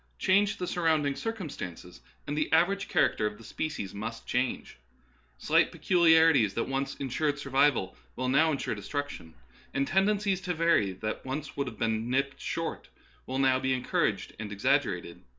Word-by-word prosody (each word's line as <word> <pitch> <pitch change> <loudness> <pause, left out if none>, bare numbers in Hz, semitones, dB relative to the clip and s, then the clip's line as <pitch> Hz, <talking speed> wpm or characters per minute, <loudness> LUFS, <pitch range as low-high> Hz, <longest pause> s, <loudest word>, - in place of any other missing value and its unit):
Change 200 +2 +2
the 180 - -3
surrounding 160 -5 +1
circumstances, 140 - -6 0.2
and 145 - -3
the 155 0 -1
average 190 +5 +2
character 160 - +2
of 105 0 -6
the - - -14
species 130 -6 -4
must 115 +3 -6
change. 125 - -2 0.6
Slight - - +3
pe - - -12
culiarities 160 - +4
that 115 - +1
once 135 +1 -2
insured 145 +2 -1
survival 135 -7 +1 0.2
will 130 - -2
now 155 +5 +4
insure 140 - -2
destruction, 105 - -5 0.4
and 140 - +2
tendencies 195 +1 +1
to 180 -1 -2
vary 165 - +3
that 110 +4 -5
once 140 +3 -5
would 140 -1 -2
have 115 -4 -7
been 110 +1 -1
nipped 135 +2 -1
short - - -4 0.4
will 130 - -3
now 130 -1 +3
be 130 0 +1
encouraged 125 - -1
and 105 -2 -5
exaggerated. 100 -6 0
140 Hz, 160 wpm, -29 LUFS, 115-160 Hz, 0.6 s, culiarities